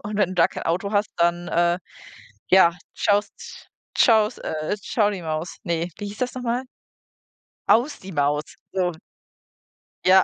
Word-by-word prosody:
und 205 Hz, 0 st, -4 dB
wenn 195 Hz, -3 st, +2 dB
du 185 Hz, -, -5 dB
da -, -, +4 dB
kein -, -, -7 dB
Auto 185 Hz, +5 st, -1 dB
hast, 205 Hz, +1 st, +1 dB
dann, 175 Hz, +1 st, +1 dB
äh, 175 Hz, +1 st, +2 dB, 0.7 s
ja, 185 Hz, -2 st, +6 dB, 0.2 s
schaust 205 Hz, 0 st, -1 dB, 0.3 s
schaus 220 Hz, -1 st, +4 dB
äh, 155 Hz, +5 st, -3 dB
„tschau 210 Hz, +1 st, +1 dB
die 190 Hz, -3 st, -5 dB
Maus“ 160 Hz, +2 st, -4 dB
ne, 170 Hz, -1 st, -1 dB
wie 205 Hz, -, -5 dB
hieß 205 Hz, +1 st, -8 dB
das 250 Hz, 0 st, -2 dB
noch 255 Hz, -, -5 dB
mal? 245 Hz, +2 st, -1 dB, 1.0 s
„Aus 260 Hz, +6 st, +3 dB
die 195 Hz, -, -9 dB
Maus.“ 145 Hz, -1 st, +1 dB, 0.3 s
So. 180 Hz, -2 st, 0 dB, 1.1 s
Ja. 190 Hz, +1 st, +7 dB
190 Hz, 160 wpm, -23 LUFS, 170-210 Hz, 1.1 s, Ja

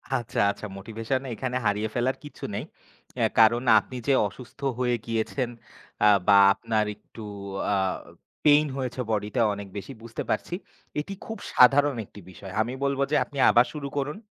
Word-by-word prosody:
আচ্ছা, 120 Hz, -4 st, -2 dB
আচ্ছা, 105 Hz, -, -8 dB
motivation 115 Hz, +5 st, -3 dB
এখানে 125 Hz, +3 st, -3 dB
হারিয়ে 105 Hz, +1 st, +1 dB
ফেলার 130 Hz, +2 st, +1 dB
কিছু 145 Hz, -, -12 dB
নেই। -, -, -3 dB, 0.5 s
অ্যা -, -, +3 dB
কারণ 115 Hz, +2 st, +5 dB, 0.2 s
আপনি 125 Hz, +4 st, -9 dB
যে 140 Hz, -, +4 dB
অসুস্থ 125 Hz, +7 st, -13 dB, 0.2 s
হয়ে 125 Hz, -1 st, +2 dB
গিয়েছেন, 115 Hz, +2 st, -1 dB, 0.6 s
আ -, -, +8 dB, 0.2 s
বা 100 Hz, -, +7 dB, 0.2 s
আপনার 110 Hz, 0 st, -1 dB
একটু 110 Hz, +2 st, -14 dB, 0.5 s
আ -, -, +3 dB, 0.7 s
পেইন 150 Hz, +1 st, +6 dB
হয়েছে 130 Hz, -1 st, -3 dB
বডিতে 105 Hz, +3 st, -1 dB
অনেক 100 Hz, 0 st, -7 dB
বেশি 100 Hz, -, -7 dB
বুঝতে 115 Hz, 0 st, -6 dB
পারছি। -, -, -1 dB, 0.5 s
এটি 155 Hz, +7 st, -4 dB
খুব 225 Hz, -, -6 dB, 0.2 s
সাধারণ 140 Hz, +2 st, +6 dB
একটি 100 Hz, -, -14 dB
বিষয়। 95 Hz, +1 st, -10 dB
আমি 120 Hz, +3 st, -2 dB
বলব 140 Hz, 0 st, 0 dB
যে -, -, +3 dB
আপনি 145 Hz, -, -12 dB
আবার 120 Hz, +1 st, +6 dB
শুরু 145 Hz, -2 st, -5 dB
করুন। 145 Hz, +4 st, -2 dB
120 Hz, 165 wpm, -26 LUFS, 110-135 Hz, 0.7 s, আ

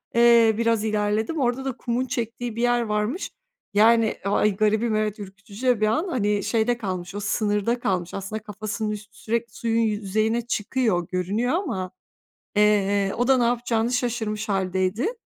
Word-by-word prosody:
Eee, 235 Hz, -2 st, +6 dB
biraz 230 Hz, -2 st, +1 dB
ilerledim. 215 Hz, +7 st, 0 dB
Orada 255 Hz, +1 st, 0 dB
da 265 Hz, -2 st, -3 dB
kumun 245 Hz, +1 st, -1 dB
çektiği 235 Hz, -1 st, -4 dB
bir 235 Hz, -, -3 dB
yer 240 Hz, 0 st, +3 dB
varmış. 215 Hz, -, -2 dB, 0.4 s
Yani, 225 Hz, +1 st, +4 dB
ay 205 Hz, 0 st, +2 dB
garibim, 215 Hz, +2 st, +1 dB
evet, 215 Hz, 0 st, -1 dB
ürkütücü 200 Hz, +4 st, -8 dB
de 245 Hz, -4 st, +3 dB
bir 215 Hz, -, +4 dB
an. 235 Hz, -, 0 dB
Hani, 210 Hz, -, 0 dB
şeyde 230 Hz, +2 st, +1 dB
kalmış, 185 Hz, -4 st, -5 dB
o 205 Hz, -, -3 dB
sınırda 210 Hz, +3 st, 0 dB
kalmış. 180 Hz, -6 st, -2 dB
Aslında 195 Hz, +2 st, -5 dB
kafasının 215 Hz, +1 st, -4 dB
üstü 210 Hz, +1 st, -8 dB
sürekli 230 Hz, 0 st, -2 dB
suyun 230 Hz, -1 st, 0 dB
yüzeyine 215 Hz, +1 st, 0 dB
çıkıyor, 210 Hz, -6 st, 0 dB
görünüyor 200 Hz, -, -1 dB
ama, 190 Hz, -, -2 dB, 0.7 s
eee, 205 Hz, -1 st, +3 dB
o 245 Hz, +2 st, +1 dB
da 265 Hz, -1 st, +5 dB
ne 240 Hz, -, +3 dB
yapacağını 235 Hz, 0 st, 0 dB
şaşırmış 225 Hz, -3 st, -2 dB
hâldeydi. 190 Hz, -, 0 dB
220 Hz, 155 wpm, -24 LUFS, 205-235 Hz, 0.7 s, Eee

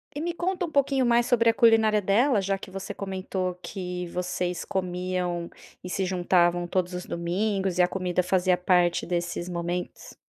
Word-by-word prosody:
e 295 Hz, -, -3 dB
me 345 Hz, +1 st, -1 dB
conta 355 Hz, 0 st, -2 dB
um -, -, -10 dB
pouquinho 275 Hz, -2 st, +2 dB
mais 235 Hz, 0 st, +4 dB
sobre 235 Hz, -2 st, +3 dB
a -, -, +4 dB
culinária 225 Hz, -3 st, +5 dB
dela, 210 Hz, +5 st, +3 dB
já 195 Hz, 0 st, 0 dB
que 190 Hz, -, -9 dB
você 190 Hz, 0 st, -6 dB
comentou 185 Hz, -2 st, -3 dB
que 180 Hz, -1 st, -5 dB
vocês 180 Hz, -1 st, -2 dB
comiam 180 Hz, -2 st, -2 dB, 0.3 s
e 180 Hz, -, -6 dB
se 190 Hz, +1 st, -1 dB
juntavam 175 Hz, -1 st, +2 dB
todos 180 Hz, 0 st, -1 dB
os 180 Hz, 0 st, -4 dB
domingos, 190 Hz, +2 st, -1 dB
e -, -, +7 dB
a 180 Hz, -, +5 dB
comida 180 Hz, -1 st, -1 dB
fazia 185 Hz, 0 st, +2 dB
parte 180 Hz, -1 st, +2 dB
desses 175 Hz, 0 st, -2 dB
momentos. 175 Hz, +1 st, -4 dB
185 Hz, 175 wpm, -26 LUFS, 180-210 Hz, 0.3 s, e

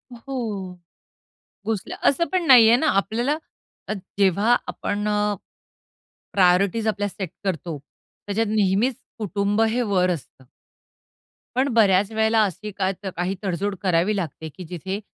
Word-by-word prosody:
हो, 220 Hz, -8 st, -5 dB, 0.9 s
उचलाय 215 Hz, -2 st, -3 dB
असं 280 Hz, +5 st, +2 dB
पण 365 Hz, -2 st, +1 dB
नाहीये 235 Hz, -4 st, +8 dB
ना 315 Hz, -, 0 dB
आपल्याला 240 Hz, +8 st, 0 dB, 0.5 s
अ, -, -, -1 dB, 0.3 s
जेव्हा 200 Hz, +5 st, +4 dB
आपण 205 Hz, +1 st, -2 dB
अ, 210 Hz, 0 st, +1 dB, 1.0 s
प्रायोरिटीज 195 Hz, +4 st, +3 dB
आपल्या 205 Hz, -1 st, 0 dB
सेट 190 Hz, -2 st, -5 dB
करतो, 170 Hz, -4 st, -3 dB, 0.5 s
त्याच्यात 215 Hz, +2 st, 0 dB
नेहमीच 215 Hz, +4 st, +2 dB, 0.2 s
कुटुंब 205 Hz, 0 st, 0 dB
हे 225 Hz, +2 st, +2 dB
वर 190 Hz, -5 st, +2 dB
असतं. 135 Hz, -5 st, -7 dB, 1.1 s
पण 260 Hz, +2 st, +2 dB
बऱ्याच 205 Hz, -2 st, +4 dB
वेळेला 220 Hz, 0 st, +3 dB
अशी 210 Hz, +2 st, -4 dB
का 190 Hz, -1 st, -1 dB, 0.2 s
काही 180 Hz, +3 st, -1 dB
तड-जोड 195 Hz, +1 st, -1 dB
करावी 185 Hz, +2 st, +2 dB
लागते, 160 Hz, -4 st, -4 dB
की 180 Hz, +5 st, -10 dB
जिथे 185 Hz, +4 st, -5 dB
205 Hz, 125 wpm, -23 LUFS, 185-225 Hz, 1.1 s, नाहीये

